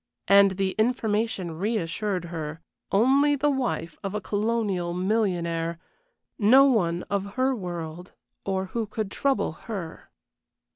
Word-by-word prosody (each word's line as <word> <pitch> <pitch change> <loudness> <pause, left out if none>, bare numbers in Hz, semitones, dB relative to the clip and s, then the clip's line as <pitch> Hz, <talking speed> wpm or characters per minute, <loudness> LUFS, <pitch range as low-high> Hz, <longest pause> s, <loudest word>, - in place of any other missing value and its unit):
And 195 -1 +6
the 195 -1 +1
information 215 -7 0
reassured 195 -2 -1
her. 155 -1 -5 0.3
Only 275 +7 +4
the 290 +1 +2
wife 240 - -2
of 195 +1 -3
a - - 0
colonial 205 -4 -1
millionaire; 175 -4 0 0.6
no 250 +6 +7
one 180 -10 +2
of 200 0 -3
her 260 +1 +2
world 175 -3 -6 0.3
or 190 -1 -1
who 230 -2 -1
could 215 -1 -4
trouble 275 - 0
her. 170 0 -7
200 Hz, 125 wpm, -26 LUFS, 175-230 Hz, 0.6 s, no